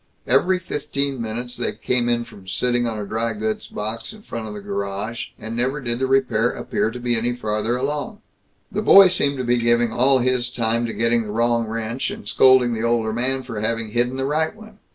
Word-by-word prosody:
Every 175 +9 +3
fifteen 140 -6 -3
minutes 120 +2 -4
they - - -2
came 120 -1 0
in 120 0 0
from 95 -4 -15
sitting 120 +4 0
on 110 -1 -3
a 105 - -4
dry 115 +3 -1
goods 110 0 -3
box 110 - -5
in 215 -1 -14
front 115 - -6
of 105 - -7
the - - -6
garage, 100 +3 -4
and 110 +1 -6
never 130 +5 0
did 120 -3 -2
the 130 - 0
repair 125 -4 +2
appear 110 - -2
to 125 - -7
be 120 0 0
any 120 +2 0
farther 110 0 -1
along. 150 - -3 0.5
The 210 - -1
boy 195 -3 +8
seemed 140 -6 +1
to 130 - -2
be 120 0 +2
giving 120 0 +2
all 130 +2 +4
his 125 -1 +1
time 115 0 0
to 115 - -4
getting 115 0 +2
the 105 -2 -6
wrong 115 +1 +1
wrench, 115 +3 -3
and 100 - -8
scolding 130 +1 +5
the 110 - -3
older 115 -1 +1
man 130 +3 0
for 115 -4 -6
having 110 0 -1
hidden 125 +3 0
the 135 - -1
right 155 +6 0
one. 215 -1 -15
120 Hz, 215 wpm, -22 LUFS, 110-130 Hz, 0.5 s, boy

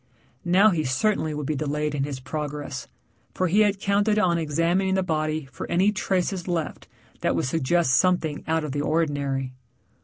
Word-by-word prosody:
Now 190 +4 +5
he 165 -4 0
certainly 155 +5 0
would 150 -1 -4
be 155 - -1
delayed 150 +1 -2
in 140 -2 -1
his 140 -2 -5
progress, 145 0 -5 0.5
for 185 - +1
he 190 +5 +2
had 205 -2 +3
counted 205 +2 +2
on 175 -5 +2
examining 165 +5 +1
the 190 - +1
body 155 -3 -1
for 125 - -7
any 185 +4 +3
traces 190 -1 -1
left 170 -4 -3 0.3
that - - 0
would - - 0
suggest 160 +1 +1
something 170 -4 +2
out 160 0 +1
of 150 - -4
the 145 +1 -2
ordinary. 145 -4 -1
160 Hz, 175 wpm, -25 LUFS, 145-185 Hz, 0.5 s, Now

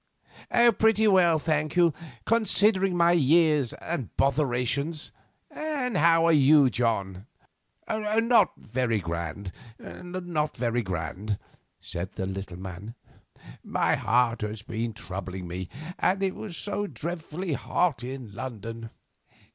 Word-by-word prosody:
"Pretty 220 0 +4
well, 180 -5 +5
thank 155 -1 -1
you, 170 -3 +4 0.3
considering 205 -4 +2
my 170 0 +5
years 155 -4 +3
and 150 - -4
botherations. 140 +2 0 0.4
And 285 -7 -3
how 165 0 +5
are 165 - +5
you, 145 -2 +6
John?" 105 -4 -1 0.6
"Not 220 0 +2
very 115 0 -1
grand, 85 +2 -4 0.3
not 175 -4 -4
very 120 0 0
grand," 95 +2 -3 0.4
said 85 +2 -6
the 95 - -3
little 95 -2 -6
man; 95 +5 -8 0.7
"my - - +1
heart 120 +1 +1
has 105 0 -4
been 115 +1 -3
troubling 95 -3 -6
me, 90 +1 -5 0.3
and 195 +1 +1
it 190 -1 +1
was 190 -6 -7
so 205 0 -3
dreadfully 165 - -5
hot 150 -1 0
in 125 -4 -7
London." 115 -1 -6
135 Hz, 115 wpm, -27 LUFS, 105-175 Hz, 0.7 s, you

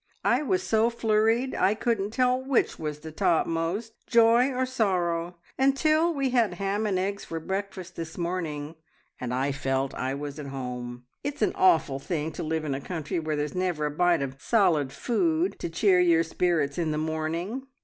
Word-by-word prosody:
I - - +3
was 370 +5 0
so 225 -4 +3
flurried 225 +2 +1
I 200 - +2
couldn't 220 -3 0
tell 255 +3 +1
which 265 -2 +1
was 150 -2 -4
the 160 - -8
topmost, 170 +4 0
joy 235 +2 +5
or 260 0 0
sorrow, 180 -8 0 0.2
until 310 +5 +3
we 275 -4 -1
had 230 -7 +2
ham 200 +3 -1
and 195 -3 0
eggs 200 +2 -2
for 165 - -5
breakfast 190 +1 -5
this 165 -1 -6
morning, 165 -4 -3 0.5
and 125 -1 -4
I 130 +3 0
felt 135 -1 -1
I 130 +1 -2
was 145 +1 -6
at 145 - -6
home. 125 -2 -6 0.2
It's 285 -4 -2
an - - +3
awful 160 -7 +3
thing 160 +1 -3
to - - -6
live 160 0 -2
in 140 - -1
a 135 - -3
country 160 0 -3
where 155 -1 -2
there's 150 0 -2
never 180 -5 -1
a 150 - -1
bite 170 0 +2
of 135 0 -6
solid 170 - +2
food 325 - 0
to - - -3
cheer 180 +2 +3
your 170 -2 +4
spirits 165 -3 0
in 165 -2 0
the 150 - -1
morning! 165 - -3
175 Hz, 185 wpm, -27 LUFS, 155-225 Hz, 0.5 s, joy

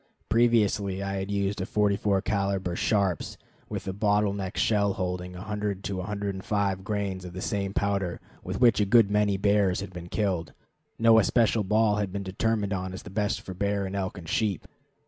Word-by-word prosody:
Previously 105 -4 +2
I 100 0 -2
had 95 +1 -4
used 100 0 -1
a - - -1
44 100 -1 +1
caliber 100 -3 -1
Sharps, 95 -4 0 0.3
with - - -5
a 95 - -2
bottle 105 0 +2
neck 95 -2 -5
shell 100 -2 +2
holding 90 -1 -3
100 105 +1 -4
to 100 - -3
105 100 0 -2
grains 100 -2 -2
of 90 -1 -8
the 95 - -6
same 100 0 -2
powder 100 -3 -1 0.2
with - - -4
which 120 -4 +5
a - - +3
good 115 -2 +5
many 105 -1 +2
bears 100 -2 +2
had 95 - -6
been 85 0 -8
killed. 95 -6 -1 0.4
No 115 0 +6
especial 110 0 +3
ball 105 +1 +2
has 105 -1 0
been 100 +1 -5
determined 100 +2 -1
on 95 -1 -3
as 95 - -7
best 105 +1 -2
for 95 - -7
bear 100 +1 -1
and 95 +1 -5
elk 95 -1 -3
and 85 -2 -9
sheep. 100 +1 -1
100 Hz, 185 wpm, -27 LUFS, 95-105 Hz, 0.4 s, No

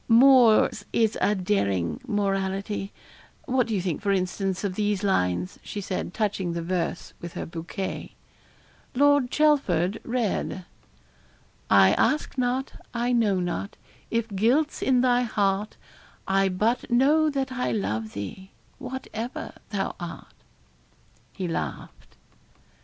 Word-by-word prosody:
'Moore's 235 -3 +6
is 225 -1 +2
a 210 - +3
daring 100 - 0
morality 195 0 -1 0.5
what 255 -2 +1
do 225 - -1
you 190 - 0
think, 175 -5 -2
for 200 -1 +1
instance, 190 0 -1
of 200 -2 -1
these 205 0 -1
lines?' 90 - 0
she 205 - -6
said, 185 -3 -3
touching 195 -4 -1
the 170 - -3
verse 175 0 -2
with 170 -1 -7
her - - -4
bouquet. 170 +3 -5 0.8
Lord 285 -1 +4
Chelford 225 - +2
read 230 -6 -2 1.0
I 95 -1 +7
ask 305 - +1
not, 255 +1 -1 0.2
I 240 +1 0
know 215 -6 +2
not, 175 +3 -3 0.3
if 230 -1 0
guilt's 240 +10 +1
in 255 -2 +3
thy 245 -1 +3
heart 205 -3 0 0.5
I 195 0 +3
but 220 +9 0
know 290 +6 +4
that 270 -2 -2
I 250 -1 -1
love 110 - -2
thee, 100 - -7 0.3
whatever 250 -2 -6 0.2
thou 200 -2 -2
art.' 175 -2 -8 1.0
He 185 -3 -4
laughed. 165 - -5
205 Hz, 125 wpm, -26 LUFS, 185-245 Hz, 1.0 s, I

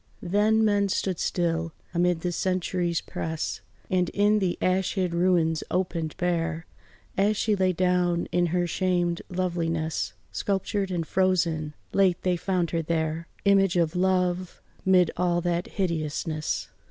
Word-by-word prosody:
Then 210 +4 +3
men 205 -1 +2
stood 185 -1 -1
still 165 -2 -1 0.2
amid 175 -1 +2
the 180 - -1
centuries' 180 -1 -1
press, 160 0 -4 0.3
And 180 -2 +1
in 205 +1 +4
the 185 -3 0
ash 185 +2 +1
hid 185 -3 0
ruins 170 -2 +2
opened 170 -4 -2
bare, 165 -2 -1 0.5
As 205 +2 +3
she 215 0 +2
lay 185 -1 +2
down 180 -1 +1
in 175 0 +2
her 175 +1 +1
shamed 175 0 0
loveliness, 170 -3 -1 0.2
Sculptured 195 0 -1
and 175 -3 -2
frozen, 165 -5 +1 0.2
late 185 -3 +3
they 180 -1 +2
found 175 -1 -1
her 165 - 0
there, 160 0 -2 0.2
Image 195 -2 +4
of 170 0 +1
love 180 -1 0 0.2
'mid 180 -3 +4
all 175 -1 +2
that 175 0 -1
hideousness. 155 -4 -2
180 Hz, 140 wpm, -26 LUFS, 170-185 Hz, 0.5 s, in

